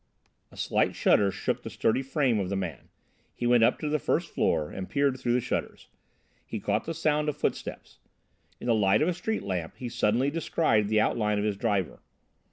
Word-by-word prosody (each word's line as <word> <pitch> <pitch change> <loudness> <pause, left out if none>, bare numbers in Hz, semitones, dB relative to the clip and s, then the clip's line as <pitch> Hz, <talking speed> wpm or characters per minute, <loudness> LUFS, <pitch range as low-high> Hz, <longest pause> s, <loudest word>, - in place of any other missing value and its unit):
A - - -16
slight - - +1
shudder 100 -1 +4
shook 95 - -2
the - - -7
sturdy 115 - +1
frame 135 -4 +1
of 95 -2 -2
the 100 - -1
man. 90 -8 -5 0.5
He 120 - -3
went 120 -1 +5
up - - +4
to 155 - -4
the 150 +1 +1
first - - -1
floor 75 -1 +1
and 95 -1 -6
peered 140 -2 +1
through 120 - 0
the 125 - +2
shutters. - - -4 0.5
He 110 - -5
caught 105 +2 -1
the 165 - -4
sound 150 -1 +1
of 150 - -4
footsteps. - - -4 0.6
In - - -8
the 120 - +3
light 105 +2 +3
of - - +1
a 180 - +1
street 200 +6 -3
lamp 90 -4 -3
he 125 - -5
suddenly 120 +5 +1
descried 150 -9 +1
the 110 +1 +2
outline 105 -2 +1
of 105 - 0
his 105 -2 0
driver. 95 -2 -1
115 Hz, 205 wpm, -28 LUFS, 100-140 Hz, 0.6 s, went